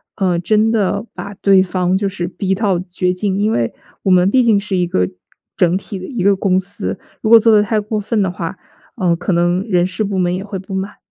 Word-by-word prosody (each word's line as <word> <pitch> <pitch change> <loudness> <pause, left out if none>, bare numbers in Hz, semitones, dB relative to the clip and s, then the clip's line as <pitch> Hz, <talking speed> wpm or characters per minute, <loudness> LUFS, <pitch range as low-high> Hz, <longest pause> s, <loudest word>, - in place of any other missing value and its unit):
呃， 185 -4 +1
真 215 +6 +2
的 205 -1 0
把 200 +3 -7
对 195 -1 +4
方 180 0 0
就 195 +1 0
是 180 -3 -4
逼 190 +1 -2
到 195 -2 +1
绝 180 0 0
境， 190 +1 -1
因 215 +2 +1
为 115 -1 -1 0.3
我 190 - +2
们 180 +1 +5
毕 255 +4 +3
竟 220 -3 +4
是 200 -1 -3
一 180 -1 +1
个 90 - 0 0.5
整 175 +1 +2
体 195 +1 -7
的 185 - -7
一 240 -3 -4
个 200 +2 +4
公 185 -1 +1
司。 180 - -5 0.2
如 215 - -1
果 230 0 +9
做 225 0 +4
得 210 - +5
太 215 +1 0
过 215 +1 -3
分 210 +1 -1
的 190 - +1
话， 175 0 -5 0.4
呃， 180 -5 +2
可 175 +3 -3
能 175 +2 +1
人 180 -2 +2
事 185 +4 -3
部 195 -2 -2
门 180 0 +1
也 190 - -4
会 200 -2 -6
不 190 +1 -9
满。 190 +1 -4
190 Hz, 260 characters per minute, -17 LUFS, 180-205 Hz, 0.5 s, 果